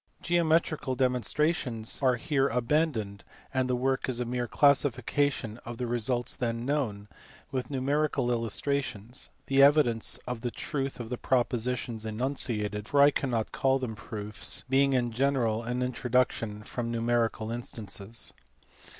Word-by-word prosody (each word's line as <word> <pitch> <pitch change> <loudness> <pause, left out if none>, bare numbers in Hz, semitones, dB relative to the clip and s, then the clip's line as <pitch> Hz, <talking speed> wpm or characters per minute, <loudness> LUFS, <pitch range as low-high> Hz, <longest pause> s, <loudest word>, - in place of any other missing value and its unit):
Geometrical 165 -5 +2
demonstrations 125 -1 0
are 130 -2 +4
here 135 +2 +1
abandoned, 120 -5 0 0.3
and 130 -1 +1
the 125 - +2
work 130 +1 0
is 125 -2 -1
a 125 - -1
mere 120 0 -2
classification 140 -4 +2
of 120 0 -7
the 125 - -2
results 120 +1 -1
then 115 -1 -2
known, 120 -8 -1 0.4
with 130 -2 -2
numerical 140 -1 0
illustrations: 120 0 -2 0.2
the 135 0 +4
evidence 140 -6 +4
for 125 - 0
the 120 +1 -4
truth 135 +1 -4
of 120 0 -6
the 125 - -3
propositions 120 -2 0
enunciated, 110 -3 -1
for 145 - +2
I 140 +1 +8
cannot 120 -6 -1
call 135 -1 +2
them 125 -4 -4
proofs, 105 +3 -2
being 135 +1 +3
in 120 -2 +1
general 120 -3 +1
an 125 +2 -2
induction 125 -4 0
from 115 +1 -4
numerical 115 -1 0
instances. 110 -2 -3
125 Hz, 135 wpm, -29 LUFS, 115-135 Hz, 0.4 s, I